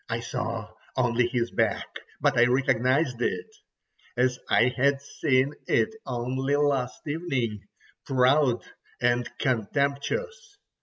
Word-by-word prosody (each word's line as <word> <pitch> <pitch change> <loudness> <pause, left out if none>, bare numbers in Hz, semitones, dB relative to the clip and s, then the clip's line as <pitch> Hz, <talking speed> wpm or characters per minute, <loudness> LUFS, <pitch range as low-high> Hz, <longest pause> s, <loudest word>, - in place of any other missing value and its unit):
I - - -1
saw - - -4 0.3
only 120 -1 +2
his 120 -1 -1
back, - - 0 0.3
but - - +2
I 120 - +6
recognized 130 0 +2
it 440 - -1 0.7
as 125 0 +2
I 125 +2 +4
had 140 +1 +2
seen 135 0 +1
it 220 - +2
only 130 +3 -1
last 140 -4 0
evening, 135 -9 -2 0.5
proud 130 -1 +3 0.4
and 120 0 +1
contemptuous. 145 - -1
130 Hz, 110 wpm, -26 LUFS, 125-140 Hz, 0.7 s, I